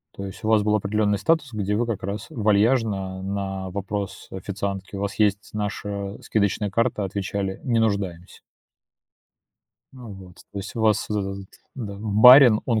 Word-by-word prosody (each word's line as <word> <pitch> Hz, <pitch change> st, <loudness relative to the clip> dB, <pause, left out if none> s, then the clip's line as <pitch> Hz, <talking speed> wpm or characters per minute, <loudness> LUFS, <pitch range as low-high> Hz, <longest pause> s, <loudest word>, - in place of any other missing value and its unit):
То 100 Hz, -, -6 dB
есть 95 Hz, -, -9 dB
у -, -, -2 dB
вас 110 Hz, -1 st, +4 dB
был 105 Hz, 0 st, +2 dB
определенный 105 Hz, 0 st, +1 dB
статус, 140 Hz, -, +1 dB
где 105 Hz, -1 st, -1 dB
вы 120 Hz, +3 st, +1 dB
как 115 Hz, -4 st, -3 dB
раз 100 Hz, +3 st, -4 dB
вальяжно 105 Hz, -3 st, +1 dB
на 95 Hz, -1 st, -4 dB
вопрос 100 Hz, +1 st, -5 dB
официантки: 100 Hz, +1 st, -5 dB
"У 100 Hz, -, -4 dB
вас 100 Hz, +1 st, -4 dB
есть 105 Hz, -1 st, +1 dB
наша 100 Hz, -1 st, -4 dB
скидочная 105 Hz, 0 st, 0 dB
карта?- 115 Hz, -1 st, 0 dB
отвечали:- 95 Hz, 0 st, -3 dB
Не 120 Hz, -3 st, +1 dB
нуждаемся". 100 Hz, -5 st, -2 dB, 1.5 s
А 125 Hz, -2 st, -11 dB
вот, 95 Hz, -3 st, -11 dB, 0.2 s
то 100 Hz, -, -5 dB
есть 100 Hz, -, -7 dB
у 115 Hz, -, -3 dB
вас 110 Hz, -2 st, +2 dB
вот 105 Hz, -, 0 dB
этот 100 Hz, 0 st, -3 dB
вот, 100 Hz, -, -9 dB, 0.4 s
да, 100 Hz, -, -7 dB
барин, 110 Hz, +3 st, +7 dB
он 115 Hz, -3 st, +1 dB
100 Hz, 170 wpm, -23 LUFS, 95-110 Hz, 1.5 s, барин